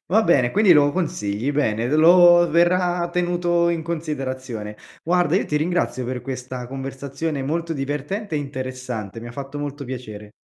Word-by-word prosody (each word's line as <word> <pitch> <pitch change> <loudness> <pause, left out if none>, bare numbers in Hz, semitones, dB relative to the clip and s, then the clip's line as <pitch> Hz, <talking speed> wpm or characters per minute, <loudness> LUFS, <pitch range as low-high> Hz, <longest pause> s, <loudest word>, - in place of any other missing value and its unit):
Va 215 +6 +4
bene, 135 - +3
quindi 205 -2 +5
lo 145 -2 +5
consigli, 125 - -2
bene, 115 -6 0
ed 125 - -2
lo 175 +2 +7
verrà 175 +1 +2
tenuto 175 -1 +1
in 170 -1 -1
considerazione. 130 -9 -5 0.3
Guarda 175 0 +2
io - - +1
ti 150 - -2
ringrazio 155 -5 -1
per 125 -1 -4
questa 125 -1 -6
conversazione 135 +3 -4
molto 165 +4 -2
divertente 150 +8 -4
e - - +1
interessante, 130 -6 -5
mi 120 - -8
ha - - -9
fatto 140 +2 -7
molto 145 0 -5
piacere. 110 -5 -8
145 Hz, 160 wpm, -22 LUFS, 130-170 Hz, 0.3 s, lo